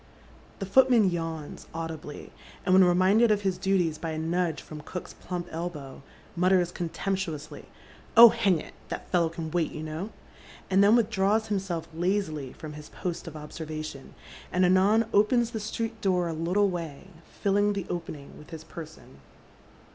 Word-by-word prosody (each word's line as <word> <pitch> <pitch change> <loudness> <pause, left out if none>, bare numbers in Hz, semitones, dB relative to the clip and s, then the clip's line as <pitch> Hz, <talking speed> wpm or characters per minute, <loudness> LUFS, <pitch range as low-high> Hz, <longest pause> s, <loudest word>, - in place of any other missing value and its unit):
The 195 - -4
footman 235 -1 +5
yawns 165 -3 -5
audibly, 160 -3 -6 0.3
and 185 - +3
when 190 0 +8
reminded 190 +6 +4
ol' 210 - +4
his 190 -3 -2
duties 185 -5 +1
by 165 - -4
a 160 - -3
nudge 165 0 -1
from 155 -1 -9
cook's 180 +4 -7
plump 175 -1 -5
elbow, 160 -6 -6 0.3
mutters 180 0 +3
con 170 -2 -4
temptuously, 165 -6 -4 0.3
" - - -23
Oh, 235 0 +12
hang 205 -6 +2
it! - - -10 0.2
that - - -5
fellow 170 -3 +3
can 160 -1 -6
wait, 170 -2 0
you 155 - -6
know; 155 +6 -5 0.3
" - - -20
and 195 +1 +5
then 205 +3 +6
withdraws 220 -1 +2
himself 190 -5 -2
lazily 165 -6 -1
from 155 -1 -9
his 150 0 -10
post 175 -1 -5
of 160 - -8
observation, 155 -2 -7 0.4
find 180 0 +3
anon 195 +5 +4
opens 230 +3 +3
the 225 - -3
street 225 +1 -4
door 180 -3 +1
a 165 - -2
little 180 +5 +1
way, 170 0 -6 0.3
filling 205 +1 +3
the 195 -3 -3
opening 160 -5 -6
with 150 - -14
his 160 -1 -8
person. 160 - -11
180 Hz, 170 wpm, -27 LUFS, 160-200 Hz, 0.4 s, Oh